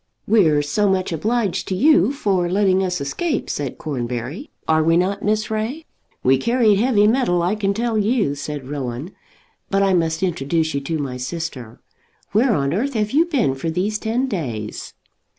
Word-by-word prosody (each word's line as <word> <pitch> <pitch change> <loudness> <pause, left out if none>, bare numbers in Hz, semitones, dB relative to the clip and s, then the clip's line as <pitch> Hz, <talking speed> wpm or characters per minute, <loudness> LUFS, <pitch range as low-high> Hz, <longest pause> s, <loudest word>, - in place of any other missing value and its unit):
"We're 160 -9 +4
so 195 +8 +1
much 190 -1 0
obliged 210 +5 -1
to 190 - -1
you 300 - +4
for 195 -10 0
letting 190 0 +2
us 180 -2 -1
escape," 285 - -2
said 145 -2 -4
Cornbury; 130 - -4 0.2
"are 160 0 +3
we 165 +1 +3
not, 190 +3 0
Miss 215 +1 0
Ray?" 230 +9 -3 0.4
"We 130 +1 +4
carried 230 - +3
heavy 220 -3 +3
metal, 215 -7 +2
I 180 +4 +1
can 205 -2 0
tell 230 0 0
you," 210 - +1
said 145 -2 -6
Rowan. 135 +3 -5 0.6
"But 195 0 +2
I 195 -1 +3
must 165 -1 0
introduce 160 -2 0
you 140 - -1
to 160 +3 -2
my 135 -4 -4
sister. 125 -4 -6 0.5
Where 225 +2 +3
on 140 +1 0
earth 255 +8 -1
have 210 -1 0
you 315 +4 +4
been 255 - +1
for 135 +5 -4
these 195 +6 -1
ten 230 +5 0
days?" 120 - -5
185 Hz, 175 wpm, -21 LUFS, 145-215 Hz, 0.6 s, We're